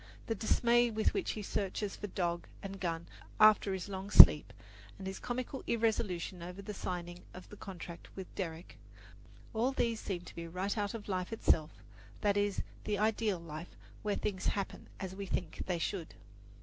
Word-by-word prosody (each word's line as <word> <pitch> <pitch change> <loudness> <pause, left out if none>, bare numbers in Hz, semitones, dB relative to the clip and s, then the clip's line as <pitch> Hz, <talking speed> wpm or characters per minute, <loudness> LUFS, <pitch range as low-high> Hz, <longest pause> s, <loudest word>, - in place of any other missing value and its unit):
the 225 - 0
dismay 235 +3 +3
with 220 -1 +1
which 390 - -1
he 210 - -5
searches 200 +1 -2
for 205 - -5
dog 175 -3 -2 0.2
and 195 0 -6
gun 170 -2 -2 0.3
after 215 -2 +7
his 190 -1 -3
long 195 0 -5
sleep, 150 -7 +10 0.5
and 195 - -8
his 190 0 -4
comical 255 +2 -4
irresolution 210 -6 0
over 190 +4 -6
signing 175 -2 -5
the 185 +3 -10
contract 175 -4 -8
with 190 - -5
Derrick 165 -3 -5 0.7
all 235 +4 +2
these 230 -4 0
seem 185 -3 -3
to - - -11
be 170 0 -6
right 185 +4 -2
out 205 0 -1
of 215 - -7
life 185 -1 -2
itself; 160 -8 +2 0.5
that 205 -2 +3
is, 205 -1 +1 0.2
the 210 -1 0
ideal 215 -1 +1
life, 165 0 -8 0.3
where 205 -1 0
things 190 -3 -2
happen 200 -1 -2
as 190 -2 -4
we 200 0 -5
think 180 -3 -3
they 180 -2 0
should. 170 0 -3
195 Hz, 170 wpm, -33 LUFS, 180-215 Hz, 0.7 s, sleep